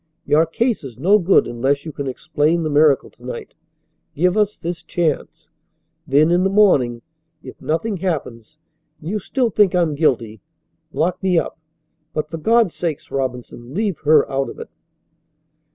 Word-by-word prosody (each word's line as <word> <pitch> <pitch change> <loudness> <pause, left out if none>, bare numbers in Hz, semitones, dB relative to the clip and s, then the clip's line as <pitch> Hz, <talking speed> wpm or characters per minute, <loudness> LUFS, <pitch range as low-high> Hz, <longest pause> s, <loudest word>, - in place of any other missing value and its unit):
Your 160 +2 +3
case 230 +6 -1
is 125 -5 -9
no 195 +10 +4
good 190 +1 +4
unless 135 +5 -1
you 160 - -5
can 140 -1 -5
explain 150 +5 0
the 155 - -2
miracle 145 -1 +3
to 120 - -23
night. 125 -1 -7 0.6
Give 180 +4 +2
us 210 -1 +1
this 170 0 -5
chance. 165 -5 -3 0.6
Then 150 +4 +4
in 175 +1 +3
the 190 - +2
morning, 135 - +3 0.4
if - - -11
nothing 185 +7 -1
happens 145 - -4 0.4
and 160 - -7
you 210 - -1
still 245 +3 -1
think 200 -2 +3
I'm 170 -4 +2
guilty, 115 - 0 0.5
lock 180 +4 -1
me 185 -2 +2
up, 165 - -2 0.5
but 155 0 -3
for 165 - -4
God's 225 +2 +2
sake, 160 -4 -3
Robinson, 125 -1 -5
leave 205 -4 -1
her 150 -1 +4
out 135 0 -2
of - - -10
it." - - -9
160 Hz, 165 wpm, -20 LUFS, 135-185 Hz, 0.6 s, no